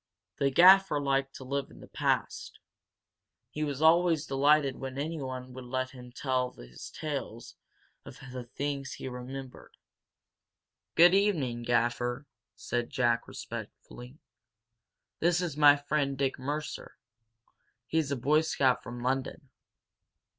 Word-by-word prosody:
The 140 - +3
Gaffer 185 +1 +6
liked 135 -1 0
to - - -9
live 140 +1 -3
in - - -15
the - - -12
past, - - -2 0.9
he 155 - -3
was 145 0 -2
always 165 -1 +4
delighted 140 0 +3
when 135 0 -6
anyone 130 -4 -5
would 130 0 -9
let 130 +1 -3
him 125 -2 -12
tell 130 -1 -1
his - - -11
tales 140 -7 -6 0.5
of - - -12
the 125 -1 -6
things 140 +1 -4
he - - -7
remembered. 130 +1 -8 1.2
"Good 175 +2 +7
evening, 160 - +1
Gaffer," 120 +2 0 0.3
said 120 -1 -3
Jack, 120 -4 +1
respectfully. 125 +4 -9 1.0
"This 175 +1 +2
is 175 -5 -3
my 145 -1 +7
friend, 145 -1 -1
Dick 135 -1 -1
Mercer. 150 +3 -5 0.9
He's 160 0 0
a 140 - 0
Boy 150 +6 +3
Scout 135 -5 +1
from 120 0 -8
London." 135 +1 -3
135 Hz, 125 wpm, -29 LUFS, 125-150 Hz, 1.2 s, Good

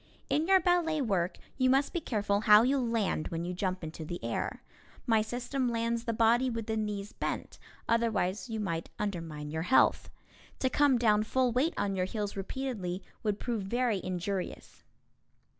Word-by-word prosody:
In 310 +3 +2
your 380 0 +6
ballet 340 -3 +2
work 195 -9 0 0.2
you 255 0 +4
must 270 +2 +2
be 345 - -1
careful 205 -6 0
how 210 +1 +7
you 270 +3 +2
land 230 -9 0
when 165 0 -4
you 180 - -3
jump 185 0 -2
into 160 0 -6
the 175 +3 -5
air. 115 0 -3 0.4
My 225 -2 +4
system 245 +3 -2
lands 230 0 -1
the 230 - 0
body 230 +3 +3
with 230 -2 -3
the 220 - -2
knees 210 -1 -3
bent, - - -4 0.3
otherwise 225 -2 0
you 220 -1 -3
might 165 -5 -3
undermine 165 -7 -4
your 160 +1 -2
health. 260 - +4 0.5
To 260 - 0
come 285 -3 +4
down 215 -3 +3
full 255 +3 +1
weight 270 +8 +1
on 200 -1 0
your 185 -1 0
heels 205 +1 -3
repeatedly 195 -3 -4 0.2
would 210 -3 -1
prove 235 -3 -2
very 230 0 0
injurious. 185 +1 -4
220 Hz, 175 wpm, -30 LUFS, 190-250 Hz, 0.5 s, how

